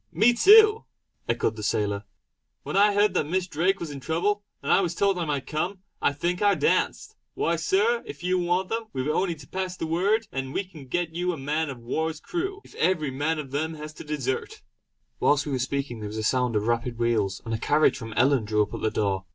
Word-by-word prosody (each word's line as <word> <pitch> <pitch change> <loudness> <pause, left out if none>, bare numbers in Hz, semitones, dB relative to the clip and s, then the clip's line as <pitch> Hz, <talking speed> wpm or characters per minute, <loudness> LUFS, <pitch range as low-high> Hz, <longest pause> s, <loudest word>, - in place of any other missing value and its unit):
"Me 235 +3 +4
too!" 425 - +7 0.5
echoed 110 - 0
the 110 - -7
sailor 105 0 -1 0.6
"When - - -5
I 205 +1 +5
heard 205 -1 +3
that 150 - 0
Miss 185 +3 0
Drake 180 +4 0
was 165 -3 -5
in 140 - -7
trouble, 180 +9 0 0.2
and - - 0
I - - +5
was 175 -2 -2
told 195 -1 +2
I 170 - -1
might 145 -3 -2
come, 180 +5 -3 0.2
I - - +3
think 175 +5 -2
I 205 -1 +4
danced. 450 -1 0 0.2
Why, - - +1
Sir, 455 +5 +2
if 420 - -9
you 180 +1 +1
want 180 +2 0
them, 225 0 -2
we've 130 +1 -2
only 170 +3 0
to 145 -3 -14
pass 185 -1 -4
the - - -3
word, 200 +7 +1
and 135 0 -4
we - - +1
can 160 -8 -13
get 170 +4 -2
you 180 +2 -1
a - - -6
man 150 +3 -1
of 135 - -6
war's 155 +7 -3
crew 385 - -4
if - - -17
every 160 -5 +1
man 145 +5 -1
of 140 -4 -6
them 160 +3 -2
has 150 0 -8
to - - -10
desert!" 150 - -3 0.6
Whilst 145 -1 +3
we 145 - -4
were 130 - -1
speaking 130 -2 -2
there 105 - -5
was 110 - -6
a 110 - -2
sound 125 0 +1
of 105 0 +1
rapid 120 +1 -1
wheels, 110 -5 0
and 115 - -3
a 110 - -1
carriage 150 +4 +3
from 115 -3 -7
Ellon 130 0 +3
drew 105 0 +2
up - - -8
at - - -5
the 110 - +1
door. 100 -3 -1
155 Hz, 235 wpm, -26 LUFS, 130-190 Hz, 0.6 s, too